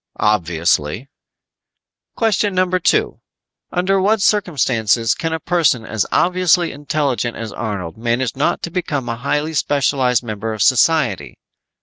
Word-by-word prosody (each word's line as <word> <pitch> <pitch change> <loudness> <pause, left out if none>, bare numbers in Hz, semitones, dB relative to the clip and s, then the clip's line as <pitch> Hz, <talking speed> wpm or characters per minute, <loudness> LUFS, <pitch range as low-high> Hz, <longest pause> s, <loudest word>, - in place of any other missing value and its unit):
"Obviously." 85 - 0 1.1
"Question 210 -3 +1
number 185 0 +1
two: 425 - +1 0.5
Under 190 +2 +1
what 215 +3 +2
circumstances 125 - +1
can 165 +5 -3
a 160 - -2
person 155 -9 +1
as 110 -2 -2
obviously 180 -1 +2
intelligent 140 -4 -2
as 115 -2 -6
Arnold 100 -7 -5
manage 120 +1 -1
not 140 - -1
to 170 - -4
become 145 -8 -3
a 115 - -2
highly 145 +5 -2
specialized 135 -4 +1
member 110 -1 -4
of 105 - 0
society? 130 - +2
135 Hz, 125 wpm, -18 LUFS, 110-175 Hz, 1.1 s, what